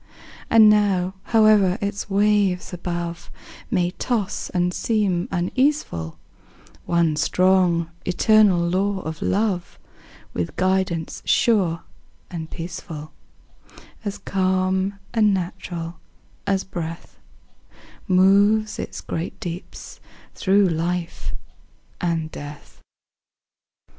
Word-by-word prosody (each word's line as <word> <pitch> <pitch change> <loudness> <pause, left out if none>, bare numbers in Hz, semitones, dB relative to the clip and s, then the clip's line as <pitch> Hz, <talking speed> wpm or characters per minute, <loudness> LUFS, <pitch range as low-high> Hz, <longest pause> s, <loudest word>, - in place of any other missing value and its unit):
And 225 -1 +7
now, 200 -3 +3
howe'er 215 -4 +4
its 200 0 -3
waves 200 -3 +2
above 170 -1 -4 0.4
May 180 -6 +1
toss 210 -1 -2
and 180 0 0
seem 200 -6 0
uneaseful, 180 - 0 0.7
One 170 -2 +2
strong, 175 0 +2
eternal 185 -1 +4
law 190 +2 0
of 160 -1 -6
Love, 195 -3 -1 0.6
With 85 -1 -3
guidance 185 -3 0
sure 185 -8 +2 0.5
and 160 -2 -5
peaceful, 165 -3 -7 0.9
As 205 -1 -4
calm 190 +1 0 0.2
and 215 -3 +4
natural 175 -2 -5 0.5
as 195 -1 +1
breath, 165 -3 -7 0.9
Moves 200 +4 +4
its - - -5
great 165 +1 -5
deeps 175 +2 -7 0.3
through 195 +1 +3
life 170 - -2 0.7
and 165 -2 -1
death. 145 0 -10
185 Hz, 90 wpm, -22 LUFS, 170-200 Hz, 0.9 s, And